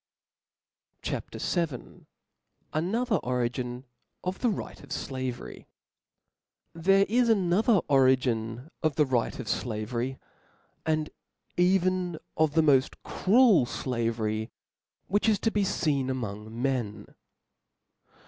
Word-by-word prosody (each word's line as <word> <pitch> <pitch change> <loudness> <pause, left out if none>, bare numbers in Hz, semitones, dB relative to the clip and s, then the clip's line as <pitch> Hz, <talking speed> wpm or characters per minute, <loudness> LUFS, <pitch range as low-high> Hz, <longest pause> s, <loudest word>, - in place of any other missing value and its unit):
CHAP. - - -3
VII. 165 -9 -3 0.7
Another 210 +8 +1
Origin 125 -1 -2 0.4
of 185 +1 -3
the 245 - +2
Right 205 - -5
of 140 - -14
Slavery. 130 -2 -5 1.1
HERE 195 +4 +4
is 240 +2 +3
another 200 +1 +3
origin 130 -1 +2
of 155 -3 +1
the 150 - +4
right 125 -4 0
of 125 - -6
flavery, 120 +4 -2 0.7
and 155 -1 0 0.4
even 180 -1 +2 0.2
of 155 -1 +2
the 160 - +5
moft 135 -3 +3
cruel 210 - +4
flavery, 115 -4 -2 0.6
which 205 +3 +2
is 215 - +3
to 225 - 0
be 210 - +1
feen 150 -9 0
among 110 -3 -5
men. 120 -6 -1
140 Hz, 105 wpm, -28 LUFS, 125-185 Hz, 1.1 s, the